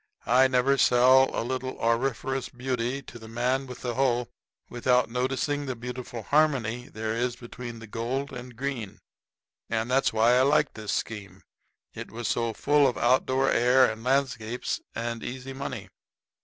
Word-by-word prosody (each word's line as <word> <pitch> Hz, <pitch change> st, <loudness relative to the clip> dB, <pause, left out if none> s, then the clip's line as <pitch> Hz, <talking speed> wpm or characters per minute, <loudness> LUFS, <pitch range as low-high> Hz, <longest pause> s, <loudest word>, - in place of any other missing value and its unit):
I 130 Hz, +4 st, +5 dB
never 130 Hz, +1 st, +2 dB
sell 130 Hz, +2 st, +6 dB
a -, -, -2 dB
little 130 Hz, +1 st, -3 dB
auriferous 125 Hz, +2 st, 0 dB
beauty 125 Hz, +1 st, -3 dB
to 120 Hz, -, -11 dB
the 110 Hz, -, -11 dB
man 125 Hz, +4 st, -1 dB
with 125 Hz, -1 st, -9 dB
the 120 Hz, -1 st, -2 dB
hoe 125 Hz, -2 st, +1 dB, 0.4 s
without 125 Hz, -1 st, +1 dB
noticing 135 Hz, +3 st, -1 dB
the 130 Hz, -, -2 dB
beautiful 120 Hz, -1 st, -6 dB
harmony 130 Hz, -5 st, +1 dB
there 110 Hz, 0 st, -3 dB
is 120 Hz, +1 st, -1 dB
between 120 Hz, -1 st, -8 dB
gold 115 Hz, +5 st, -4 dB
and 125 Hz, -1 st, -8 dB
green. 125 Hz, -5 st, -4 dB, 0.7 s
And 115 Hz, +2 st, -1 dB
that's 135 Hz, +1 st, +3 dB
why 115 Hz, +3 st, +4 dB
I -, -, +5 dB
liked 145 Hz, +3 st, +3 dB
this 110 Hz, -2 st, -5 dB
scheme; 105 Hz, -3 st, -4 dB, 0.5 s
it -, -, -7 dB
was 115 Hz, +2 st, -5 dB
so 115 Hz, -1 st, 0 dB
full 145 Hz, +4 st, +3 dB
of 125 Hz, -, -1 dB
outdoor 130 Hz, +2 st, +2 dB
air 125 Hz, +2 st, +5 dB
and 110 Hz, 0 st, -9 dB
landscapes 125 Hz, -3 st, -1 dB
and 115 Hz, 0 st, -3 dB
easy 130 Hz, +2 st, -6 dB
money. 135 Hz, +1 st, -5 dB
125 Hz, 155 wpm, -27 LUFS, 115-130 Hz, 0.7 s, sell